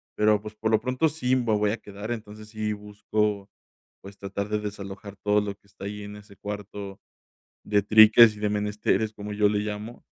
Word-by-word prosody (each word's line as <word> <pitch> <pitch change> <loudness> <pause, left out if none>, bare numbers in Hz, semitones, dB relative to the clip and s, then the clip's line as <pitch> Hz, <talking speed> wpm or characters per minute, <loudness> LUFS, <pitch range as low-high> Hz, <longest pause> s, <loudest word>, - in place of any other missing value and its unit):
Pero, 105 0 +3
pues, 105 0 -9
por 110 +1 -1
lo 110 - +4
pronto, 130 +5 +1
sí 130 -4 0
me 125 -2 0
voy 105 0 +2
a 110 - -2
quedar. 100 +2 -8
Entonces, 110 -2 -7
sí 110 -1 -2
busco, 105 0 -2 0.5
pues, 100 +1 -12
tratar 100 +1 -4
de 105 0 0
desalojar 100 -1 -7
todo 105 0 +3
lo 100 -1 -4
que 100 - -37
está 100 - -11
ahí 105 +1 -5
en 105 0 -8
ese 105 -1 -15
cuarto 100 -1 -7 0.6
de 105 -1 +2
triques 110 +1 +8
y - - -10
de 105 0 0
menesteres, 105 0 0
como 105 0 -7
yo 105 0 +3
le 105 0 0
llamo, 105 +3 -6
105 Hz, 200 wpm, -26 LUFS, 100-110 Hz, 0.6 s, triques